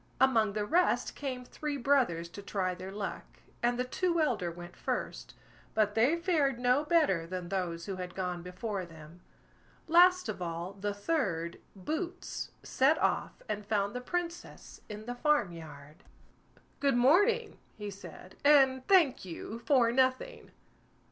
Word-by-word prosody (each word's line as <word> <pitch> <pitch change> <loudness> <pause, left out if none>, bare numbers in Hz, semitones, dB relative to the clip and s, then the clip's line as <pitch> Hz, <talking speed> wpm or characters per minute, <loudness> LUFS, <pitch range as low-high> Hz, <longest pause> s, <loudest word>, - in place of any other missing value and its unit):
Among 225 -6 +4
the 210 0 -1
rest 350 +10 +2
came 255 -3 -5
three 295 +2 -4
brothers 240 -11 +2
to 200 - -9
try 190 -2 -2
their 185 +1 -8
luck, 200 0 -4 0.4
and 240 0 +1
the 250 - +1
two 340 +6 0
elder 205 - +1
went 175 +1 -10
first, - - -4 0.4
but 210 -1 +2
they 240 +9 +3
fared 325 -7 +1
no 250 +4 +2
better 300 - +2
than 180 -1 -5
those 175 -3 -2
who 195 -2 -4
had 180 -1 -6
gone 180 -2 -3
before 185 +3 -4
them. 165 0 -13 0.7
Last 360 +2 +6
of - - -5
all 170 +2 -4
the 200 +1 -3
third, 195 - -1 0.2
Boots, 315 - -4
set 280 +5 +3
off - - -1
and 210 -1 -3
found 205 -1 0
the 250 - -4
Princess 345 +5 -5
in 210 0 -7
the 245 - -4
farm 295 - +2
yard. 150 -3 -11 0.8
"Good 275 -4 +2
morning", 410 - +3 0.2
he 210 -1 -5
said, 190 -1 -12
"and 265 -3 +5
thank 350 -9 +4
you 190 +5 -7
for 255 -6 +4
nothing." 260 - 0
225 Hz, 150 wpm, -31 LUFS, 185-290 Hz, 0.8 s, Last